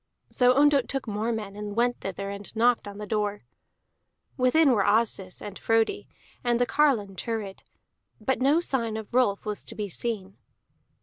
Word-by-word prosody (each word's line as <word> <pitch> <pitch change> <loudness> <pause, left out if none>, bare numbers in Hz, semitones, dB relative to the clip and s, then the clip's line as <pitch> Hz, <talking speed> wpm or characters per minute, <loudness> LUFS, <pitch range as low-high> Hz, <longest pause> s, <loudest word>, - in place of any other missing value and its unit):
So 250 0 +4
Ondott 285 -2 +4
took 270 -3 -2
more 215 +2 -1
men, 210 -3 -4
and 205 0 -6
went 240 +1 +1
thither, 195 +1 -4
and 200 +2 -9
knocked 235 0 +3
on 200 0 -8
the 210 - -6
door. 210 - -2 0.9
Within 270 +3 +4
were 210 -5 +3
Asdis, 205 -4 0
and 205 -1 -7
Frodi, 225 0 +1 0.4
and 240 -1 +1
the 245 - +3
carline 245 -10 +2
Thurid; 215 -3 -4 0.6
but 255 +4 -1
no 285 +5 +4
sign 235 -9 -1
of 220 -1 -8
Rolf 240 -6 +2
was 210 -1 -4
to - - -8
be 210 -2 -4
seen. 195 -1 -3
225 Hz, 170 wpm, -27 LUFS, 205-250 Hz, 0.9 s, So